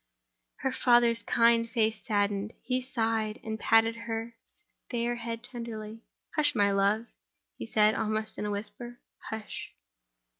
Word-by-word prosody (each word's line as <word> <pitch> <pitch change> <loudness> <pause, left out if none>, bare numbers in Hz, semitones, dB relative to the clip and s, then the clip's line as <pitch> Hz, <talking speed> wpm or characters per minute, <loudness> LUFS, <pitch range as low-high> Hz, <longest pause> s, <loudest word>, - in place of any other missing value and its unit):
Her 265 - 0
father's 240 -2 +4
kind 230 +1 +3
face 220 -2 0
saddened; 205 -2 0
he 255 0 0
sighed, 225 -4 -1
and 220 0 -4
patted 225 +1 +4
her 225 +1 -3 0.6
fair 240 0 0
head 230 0 -5
tenderly. 225 -3 -7 0.3
"Hush, 295 -2 +3
my 200 -2 +4
love," 200 +3 +2 0.5
he - - -7
said, 215 -1 +4
almost 215 0 -2
in - - -2
a - - -2
whisper; 240 +4 -5 0.3
"hush!" 220 -1 -6
225 Hz, 135 wpm, -29 LUFS, 215-235 Hz, 0.6 s, father's